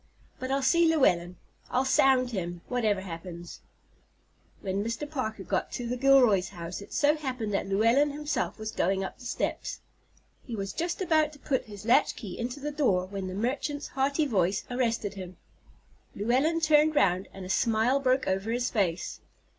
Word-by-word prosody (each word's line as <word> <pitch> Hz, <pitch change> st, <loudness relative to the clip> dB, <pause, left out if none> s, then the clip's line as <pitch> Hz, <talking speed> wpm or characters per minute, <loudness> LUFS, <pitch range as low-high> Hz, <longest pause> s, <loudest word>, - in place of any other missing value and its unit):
But 255 Hz, -, -4 dB
I'll 275 Hz, 0 st, 0 dB
see 335 Hz, +5 st, +4 dB
Llewellyn. 180 Hz, -, +2 dB, 0.3 s
I'll 255 Hz, +2 st, +1 dB
sound 260 Hz, -1 st, +4 dB
him, 175 Hz, -4 st, -4 dB
whatever 220 Hz, -6 st, 0 dB
happens." 170 Hz, -1 st, -8 dB, 1.0 s
When 195 Hz, +1 st, -2 dB
Mr. 230 Hz, +6 st, -3 dB
Parker 220 Hz, -9 st, -4 dB
got -, -, -2 dB
to 245 Hz, -, -4 dB
the 240 Hz, +1 st, -2 dB
Gilroys' 245 Hz, -8 st, +4 dB
house 175 Hz, 0 st, -7 dB
it -, -, -12 dB
so 295 Hz, +1 st, +3 dB
happened 255 Hz, -8 st, -4 dB
that 195 Hz, -, -1 dB
Llewellyn 230 Hz, +9 st, +3 dB
himself 295 Hz, +1 st, -2 dB
was 220 Hz, -1 st, -5 dB
going 195 Hz, +2 st, 0 dB
up 190 Hz, -, -6 dB
the 245 Hz, -, -12 dB
steps. 240 Hz, -, -3 dB, 0.6 s
He 235 Hz, -, -6 dB
was 195 Hz, -2 st, -4 dB
just 345 Hz, +2 st, -2 dB
about 310 Hz, -4 st, +2 dB
to -, -, -13 dB
put 270 Hz, -2 st, -1 dB
his 205 Hz, -1 st, -10 dB
latchkey 220 Hz, -4 st, +2 dB
into 245 Hz, +4 st, -4 dB
the 295 Hz, +1 st, -3 dB
door 225 Hz, -12 st, +1 dB
when 195 Hz, 0 st, -5 dB
the 185 Hz, -, -5 dB
merchant's 275 Hz, +6 st, -2 dB
hearty 280 Hz, +3 st, +1 dB
voice 195 Hz, -6 st, +1 dB
arrested 230 Hz, -5 st, -1 dB
him. 185 Hz, -3 st, -8 dB, 0.8 s
Llewellyn 265 Hz, +10 st, +1 dB
turned 310 Hz, 0 st, +4 dB
round, 185 Hz, -6 st, +2 dB
and 190 Hz, -1 st, -9 dB
a -, -, -8 dB
smile 225 Hz, +6 st, +2 dB
broke 260 Hz, -1 st, +1 dB
over 195 Hz, +3 st, -1 dB
his 240 Hz, +2 st, 0 dB
face. 185 Hz, -6 st, -1 dB
235 Hz, 170 wpm, -28 LUFS, 195-275 Hz, 1.0 s, see